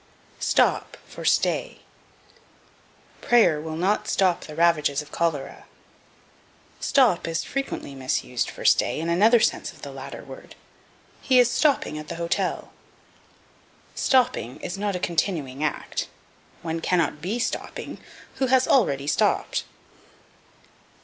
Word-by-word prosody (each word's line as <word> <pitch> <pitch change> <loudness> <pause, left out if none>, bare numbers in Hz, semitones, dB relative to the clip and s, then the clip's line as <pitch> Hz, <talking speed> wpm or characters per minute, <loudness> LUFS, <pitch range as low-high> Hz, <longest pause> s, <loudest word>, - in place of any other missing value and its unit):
Stop - - +1
for - - -10
Stay. - - +1 1.4
"Prayer 210 -11 +4
will 160 0 -5
not 190 +6 0
stop 180 -2 +2
the 155 - -9
ravages 150 -4 +2
of 150 - -18
cholera." 165 -5 -2 1.1
Stop 250 -13 +3
is 165 -1 -1
frequently 275 - -4
misused 130 -2 -2
for - - -9
stay - - +3
in 165 +1 -2
another 215 +8 +5
sense - - 0
of - - -18
the - - -6
latter - - -8
word: - - -12 0.7
"He 260 -2 +3
is 245 -1 +5
stopping 275 - +1
at 155 - -9
the 170 - -5
hotel." 170 0 -2 1.2
Stopping 245 - +1
is 175 - -4
not 200 0 -2
a - - -2
continuing 155 -6 -1
act; 155 - -2 0.6
one 165 0 -2
cannot 165 -3 0
be 195 +8 -2
stopping 245 - -4 0.4
who 265 0 +1
has 260 0 +3
already 140 - +2
stopped. 150 - +1
170 Hz, 125 wpm, -24 LUFS, 150-225 Hz, 1.4 s, another